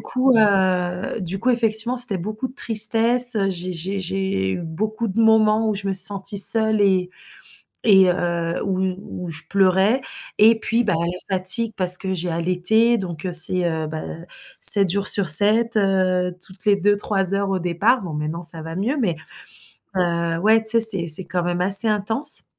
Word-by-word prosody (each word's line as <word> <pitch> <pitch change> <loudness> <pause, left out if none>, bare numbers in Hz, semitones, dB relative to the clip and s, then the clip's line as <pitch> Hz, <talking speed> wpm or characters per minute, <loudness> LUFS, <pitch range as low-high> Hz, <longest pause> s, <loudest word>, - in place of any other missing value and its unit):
coup, 255 0 -1
heu, 185 -1 -1
du 185 +2 -6
coup, 250 +4 -2
effectivement, 235 +1 -1
c'était 240 -6 -1
beaucoup 215 +7 -7
de 255 - -18
tristesse, 230 +2 +3
heu, 195 -2 -2
j'ai 180 0 -7
j'ai 190 +4 -6
j'ai 185 - -4
eu - - -6
beaucoup 215 +8 -6
de 205 +4 -4
moments 220 0 +1
où 210 - -2
je 200 0 -6
me - - -2
suis 190 0 +6
sentie 200 0 -5
seule 220 +1 +5
et 185 -2 -1 0.7
et 190 -4 +3
heu, 170 -1 -4
où 190 -2 -4 0.5
où - - -10
je 160 - -7
pleurais 195 +5 0 0.4
et 225 +2 +3
puis, 230 +1 -2
bah, 210 -5 -2
la 180 +3 -5
fatigue 220 +5 0
parce 180 -1 +4
que 190 0 -6
j'ai 180 -1 -5
allaité, 185 +8 -1
donc 175 -3 -8
heu, 185 - -4
c'est, 175 +2 +4
heu, 160 -1 -5
bah, 155 0 -8
heu, 165 +1 -11 0.4
7 195 -4 +6
jours 200 +2 -2
sur 200 -3 +5
7, 215 +7 +4
heu, 185 -3 -1
toutes 190 +2 -15
les 205 - +3
2-3 200 -1 -2
heures 200 0 -3
au 190 -2 -3
départ, 195 +8 -1
bon, 170 -4 -8
maintenant 155 +3 -6
ça 165 -1 -5
va 165 +1 -9
mieux 230 - -4
mais 195 -9 -2 0.8
heu, 170 -2 -3
ouais, 220 +4 +1
tu 220 - +3
sais, 230 -1 0
c'est 195 -7 +5
c'est 160 +4 +5
quand 180 -1 -5
même 175 0 -4
assez 195 +4 +6
intense. 215 +6 +2
195 Hz, 190 wpm, -19 LUFS, 180-220 Hz, 0.8 s, suis